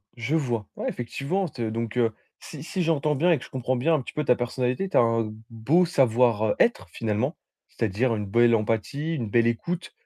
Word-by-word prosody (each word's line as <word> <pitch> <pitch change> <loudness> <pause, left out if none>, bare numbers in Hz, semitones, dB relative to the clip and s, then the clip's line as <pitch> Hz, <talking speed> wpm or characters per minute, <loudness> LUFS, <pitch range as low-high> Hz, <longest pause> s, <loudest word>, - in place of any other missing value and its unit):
Je 120 +7 -1
vois. 120 -9 -1
Ouais, - - -4
effectivement, 140 +10 -2
t 120 -6 -4
donc 115 +1 -4
heu, 115 -2 +2 0.3
si 150 -2 -9
si 185 +2 -3
j'entends 150 -2 +1
bien 175 +6 +3
et 160 - +4
que - - -10
je - - -14
comprends 130 0 -2
bien 160 +7 +1
un 150 - +2
petit - - -9
peu 150 - -1
ta 125 - +4
personnalité, 125 +8 -1
tu - - +1
as - - +7
un 115 -2 +1 0.2
beau 135 +11 +2
savoir, 120 -7 +3
heu, 105 - +1
être 235 - +2
finalement, 115 - -1 0.3
c'est-à-dire 115 +2 0
une 105 -1 -3
belle 115 +3 +4
empathie, 115 +9 -1
une 115 -7 -3
belle 115 +2 +3
écoute. 170 +10 -2
125 Hz, 215 wpm, -25 LUFS, 115-150 Hz, 0.3 s, as